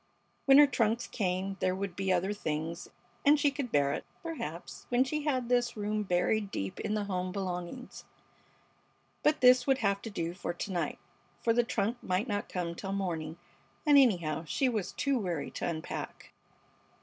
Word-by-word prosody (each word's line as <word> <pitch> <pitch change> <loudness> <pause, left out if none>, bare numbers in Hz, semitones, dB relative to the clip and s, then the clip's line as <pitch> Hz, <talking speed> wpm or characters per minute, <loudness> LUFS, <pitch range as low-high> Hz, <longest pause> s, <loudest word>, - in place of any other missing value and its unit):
When 270 0 +8
her 295 - +10
trunks 235 -3 +1
came 190 -3 -2
there 185 0 +1
would 195 -2 -4
be 195 0 0
other 185 +3 +1
things, 160 -2 -3 0.4
and 295 0 +6
she 290 -1 +3
could 275 -4 -4
bear 140 -1 +3
it, - - -3 0.2
perhaps, 235 - -6
when 245 +1 +4
she 300 +3 -2
had 260 -5 0
this 245 -1 +1
room 210 +1 -1
buried 200 +2 +1
deep 95 - -4
in 215 - -1
the 210 - 0
home 185 -2 -2
belongings. 185 +5 -5 1.2
But 300 +1 +2
this 250 0 +6
would 270 -1 +4
have 200 -3 +1
to 225 - -6
do 170 -4 -3
for 175 -1 -4
to 195 - -4
night, 175 -2 -1 0.5
for 230 - +3
the 240 +1 +3
trunk 230 +1 -1
might 185 +6 0
not 205 -2 -2
come 175 -2 -2
till 195 +3 -5
morning, 165 -5 -3 0.5
and, 295 -1 +6
anyhow, 170 - +4
she 265 - +1
was 220 -7 -1
too 275 -2 0
weary 175 -8 -3
to - - -3
unpack. 160 -2 -6
200 Hz, 180 wpm, -31 LUFS, 180-245 Hz, 1.2 s, her